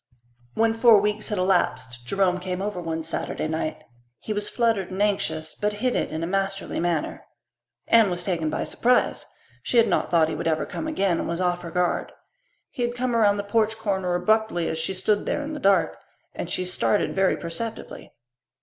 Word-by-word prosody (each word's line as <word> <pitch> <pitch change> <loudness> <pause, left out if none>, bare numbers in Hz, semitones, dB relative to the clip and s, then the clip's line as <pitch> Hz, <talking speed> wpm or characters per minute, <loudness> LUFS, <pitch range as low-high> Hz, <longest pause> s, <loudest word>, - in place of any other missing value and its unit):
When 225 0 +3
four 225 -2 +6
weeks 210 +2 -1
had 210 - -2
elapsed 130 -10 0
Jerome 185 0 +1
came 180 0 -4
over 200 -2 -3
one 165 -1 -3
Saturday 160 -1 -2
night. 155 0 -3 0.3
He 215 - -4
was 205 0 -2
fluttered 225 -6 +1
and 190 +1 -6
anxious, 160 -6 0
but 210 0 -1
hid 245 +4 -1
it - - 0
in 160 +1 -4
a - - 0
masterly 195 +2 -2
manner. 170 -3 -1 0.6
Anne 225 -3 +5
was 175 -1 -2
taken 165 -5 -1
by - - -2
surprise. 250 +1 +1 0.3
She 245 - 0
had 230 -1 +6
not - - +1
thought 165 -2 +4
he 160 - -3
would - - -3
ever 160 -1 +1
come 315 - -5
again, 195 - +1
and - - -3
was 170 +1 -2
off 175 -1 0
her 170 - -7
guard. 180 +1 0 0.6
He - - -6
had 240 0 -1
come 245 -1 -1
around 205 -3 +4
the 205 - -2
porch 220 +1 +1
corner 190 -5 -1
abruptly 180 -2 +1
as 160 - -2
she 165 +4 -2
stood 205 +3 0
there 295 - -1
in 300 +2 -5
the 300 - -5
dusk, 190 - +3 0.4
and - - -5
she 185 - -1
started 190 +3 +1
very 190 -1 +2
perceptibly. 215 +7 -6
195 Hz, 200 wpm, -25 LUFS, 175-220 Hz, 0.6 s, four